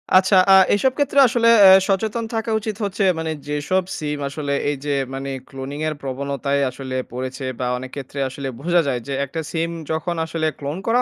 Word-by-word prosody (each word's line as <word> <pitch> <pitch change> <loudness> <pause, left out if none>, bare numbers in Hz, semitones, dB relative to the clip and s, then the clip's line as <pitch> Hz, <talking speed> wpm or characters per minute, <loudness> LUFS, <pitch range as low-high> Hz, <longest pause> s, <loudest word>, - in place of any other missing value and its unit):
আচ্ছা 185 +1 +5 0.2
আ - - +9 0.2
এসব 260 +6 +2
ক্ষেত্রে 285 -1 +2
আসলে 230 -1 +3 0.2
এ - - +10 0.2
সচেতন 220 +4 0
থাকা 225 0 -2
উচিত 215 -1 -4
হচ্ছে 200 0 -1 0.2
মানে 160 0 -2 0.2
যেসব 150 +6 0
সিম 150 -1 -3
আসলে 140 0 -3 0.2
এই 145 - -2
যে 145 - 0 0.2
মানে 135 +1 -4 0.2
cloning 135 +2 -6
এর 155 - -2
প্রবণতায় 140 +1 -2
আসলে 130 0 -6 0.2
পড়েছে 130 +2 -5
বা 125 - -1
অনেক 130 +1 -8
ক্ষেত্রে 140 0 -7
আসলে 135 +1 -6
বোঝা 175 +1 +3
যায় 125 -3 0
যে 140 - -3
একটা 160 +4 -5
সিম 165 0 -1 0.2
যখন 160 +2 -2
আসলে 160 -1 -2
clone 145 +5 -4
করা 240 +2 +3
150 Hz, 190 wpm, -21 LUFS, 140-190 Hz, 0.2 s, এ